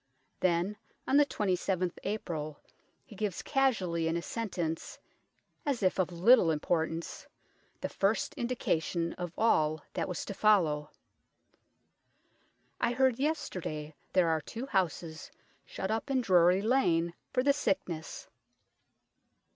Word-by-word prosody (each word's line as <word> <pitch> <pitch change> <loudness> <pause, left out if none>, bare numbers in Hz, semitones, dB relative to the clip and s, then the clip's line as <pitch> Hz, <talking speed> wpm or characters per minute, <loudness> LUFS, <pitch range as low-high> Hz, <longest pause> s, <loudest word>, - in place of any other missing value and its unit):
Then 185 +3 +1 0.3
on 270 - +4
the 290 -1 +5
27th 185 -4 -1
April 160 -7 -4 0.5
he 210 - -13
gives 200 -3 -3
casually 195 - +1
in 165 +1 0
a - - -2
sentence, 175 -8 -3 0.7
as 270 -7 -1
if 185 0 +2
of 180 -1 +1
little 180 +2 +5
importance, 160 +1 -1 0.5
the - - -1
first 200 +3 0
indication 170 -8 -1
of 175 -2 -5
all 155 -9 +2
that - - -1
was 180 -3 -4
to - - -5
follow: 170 -9 +3 1.3
" - - -28
I 240 - +2
heard 260 -1 +2
yesterday 175 - -2 0.2
there 180 -3 +4
are 160 -1 +1
2 230 - -6
houses 175 -8 -2 0.4
shut 190 - -4
up 225 +5 -2
in 265 -2 +2
Drury 180 -2 +4
Lane 170 -9 +2 0.2
for 255 - +1
the 280 +1 +4
sickness." 185 - -2
185 Hz, 125 wpm, -31 LUFS, 165-230 Hz, 1.3 s, the